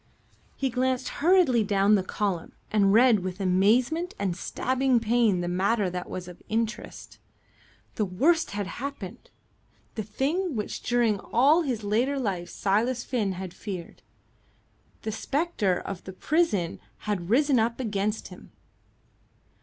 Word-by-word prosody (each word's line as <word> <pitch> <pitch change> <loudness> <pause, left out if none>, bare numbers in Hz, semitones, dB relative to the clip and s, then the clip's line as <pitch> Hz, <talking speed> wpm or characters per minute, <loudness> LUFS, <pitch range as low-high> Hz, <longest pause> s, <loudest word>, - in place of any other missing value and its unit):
He 270 -2 -1
glanced 255 +1 0
hurriedly 325 - +4
down 200 0 +3
the 205 - +4
column 185 -2 -3 0.2
and 200 -2 +4
read 230 0 +6
with 185 +1 -5
amazement 230 - +2
and 190 -3 -1
stabbing 260 +5 +1
pain 225 -4 +2
the 175 - -2
matter 195 +2 +1
that 180 0 -5
was 180 -1 -6
of 180 -1 -11
interest. 225 +1 -4 0.7
The 215 - 0
worst 305 - +2
had 205 0 -3
happened 230 0 -7 0.6
the 220 - -3
thing 285 - -1
which 210 -2 -4
during 235 -4 +1
all 280 - +3
his 250 -8 -2
later 240 +7 +1
life 190 -9 -2
Silas 230 +5 0
Finn 215 -7 -1
had 185 -1 -6
feared. 185 -5 -7 1.0
The 220 - -2
spectre 230 - 0
of 195 -2 -7
the 190 - -7
prison 205 - 0 0.3
had 195 -5 -2
risen 275 +2 +4
up 230 +2 0
against 210 -2 -2
him. - - -13
215 Hz, 140 wpm, -27 LUFS, 195-255 Hz, 1.0 s, read